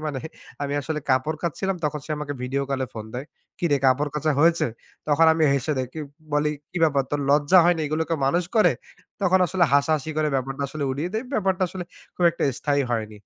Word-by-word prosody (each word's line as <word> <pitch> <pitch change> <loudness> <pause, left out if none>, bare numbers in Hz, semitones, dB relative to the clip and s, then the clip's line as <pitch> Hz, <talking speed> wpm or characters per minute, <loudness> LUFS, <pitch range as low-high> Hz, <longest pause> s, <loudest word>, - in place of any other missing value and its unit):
মানে 140 -3 -3 0.4
আমি 140 0 -2
আসলে 155 +1 -3
কাপড় 130 +4 +1
কাচছিলাম 190 +3 -1
তখন 150 0 -1
সে - - -12
আমাকে 145 -1 -4
ভিডিও 135 +2 -1
কলে 135 -1 -1
ফোন 110 -1 -6
দেয়, 130 +4 -5 0.3
‘’কিরে 155 -5 +2
কাপড় 145 +3 +2
কাচা 150 +1 +1
হয়েছে?‘’ 170 +1 +4 0.4
তখন 155 +2 +5
আমি 160 - +2
হেসে 140 +3 0
দেই, 130 - -1
কিউ 155 -2 -5 0.3
বলি, 150 0 +2 0.2
‘’কি 180 - -4
ব্যাপার 140 -3 +2
তোর 145 0 -1
লজ্জা 145 +5 +5
হয়নি 175 -1 +3
এগুলোকে 160 +2 -1
মানুষ 175 +6 +2
করে!‘’ 180 -7 +5 0.5
তখন 190 0 +4
আসলে 180 0 +2
হাসাহাসি 150 +1 +2
করে 155 -1 +2
ব্যাপারটা 135 +2 -3
আসলে 145 0 -4
উড়িয়ে 150 +7 -3
দেই। 225 +4 -1
ব্যাপারটা 190 -2 +1
আসলে 180 -1 -6 0.3
খুব 180 - +1
একটা 170 - -6 0.2
স্থায়ী 145 -1 +1
হয়নি। 110 -2 -3
150 Hz, 200 wpm, -24 LUFS, 140-170 Hz, 0.5 s, তখন